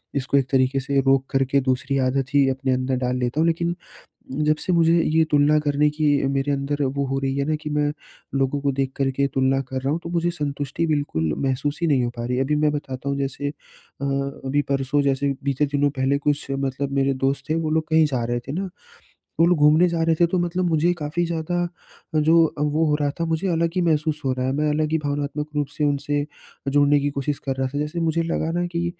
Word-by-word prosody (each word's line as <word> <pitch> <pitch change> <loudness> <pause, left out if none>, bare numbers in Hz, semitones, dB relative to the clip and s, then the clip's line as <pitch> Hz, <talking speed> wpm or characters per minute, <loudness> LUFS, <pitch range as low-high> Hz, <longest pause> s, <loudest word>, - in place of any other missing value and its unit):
इसको 140 0 +1
एक 135 -1 +1
तरीके 135 0 +2
से 135 +1 0
रोक 135 0 +3
करके, 135 +1 +2
दूसरी 130 +1 0
आदत 135 +1 -2
ही 140 -1 +4
अपने 135 0 0
अंदर 130 +1 0
डाल 125 0 0
लेता 125 +3 -1
हूँ। 165 - +3
लेकिन 170 +1 0 0.6
जब 150 +2 +1
से 185 - -1
मुझे 165 -1 +4
ये 160 +1 +3
तुलना 150 +1 +4
करने 150 0 +2
की 150 +1 -1 0.2
मेरे 135 +1 0
अंदर 140 +1 -1
वो 140 +1 -1
हो 135 +1 -1
रही 135 0 -1
है 140 - 0
ना 155 - +1
कि 150 - -4
मैं 150 0 +1 0.5
लोगों 135 +1 0
को 140 0 0
देखकर 135 0 -1
के 140 +1 0
तुलना 135 0 +2
कर 130 0 -5
रहा 135 - 0
हूँ, 160 - 0
तो - - -5
मुझे 170 0 0
संतुष्टि 145 -1 -3
बिल्कुल 145 - 0
महसूस 140 +3 -1
ही - - +3
नहीं 135 -5 +2
हो 120 - -1
पा 120 - -4
रही 125 +1 -1
है। 130 - +2
अभी 150 +2 0
मैं 150 0 +2
बताता 135 -2 -5
हूँ, 140 - -1
जैसे 140 +1 -2
अ, 140 -1 -12
अभी 140 0 -1
परसों, 135 +1 +1
जैसे 140 0 +1
बीते 140 +1 +1
दिनों 145 0 +1
पहले, 135 0 0
कुछ 145 0 -1
मतलब 135 0 -2
मेरे 135 0 +2
दोस्त 135 +4 -1
थे, - - +3
वो 160 -1 -1
लोग 160 0 +1
कहीं 160 0 +5
जा 130 -5 -2
रहे 120 +1 -1
थे - - -3
ना, 190 +5 -3 0.7
वो 165 - +6
लोग 175 -1 +3
घूमने 150 +4 +5
जा 170 -1 -1
रहे 165 0 +3
थे। 170 - +6
तो 180 +2 -1
मतलब 175 +1 0
मुझे 165 +1 +2
काफ़ी 155 +3 -1
ज़्यादा 170 +1 -1 0.5
जो 160 +2 +5
अ, - - -1
वो 150 +2 +1
हो 150 - +2
रहा 145 -1 +1
था, - - +2
मुझे 165 +4 -1
अलग 165 0 +1
ही - - +3
महसूस 155 -2 +1
हो 130 - +1
रहा 130 0 -2
है, 130 - 0
मैं 150 +2 0
अलग 155 +1 0
ही 160 - +3
भावनात्मक 145 0 -3
रूप 145 -1 +1
से 150 - 0
उनसे 145 0 0 0.4
जुड़ने 145 +1 +4
की 145 +1 0
कोशिश 140 +1 -2
कर 135 -1 -1
रहा 130 0 -1
था। - - 0
जैसे 150 +4 -2
मुझे 165 0 +1
लगा 165 -1 -1
ना 175 +1 0
कि 170 0 -2
145 Hz, 240 wpm, -23 LUFS, 135-155 Hz, 0.7 s, वो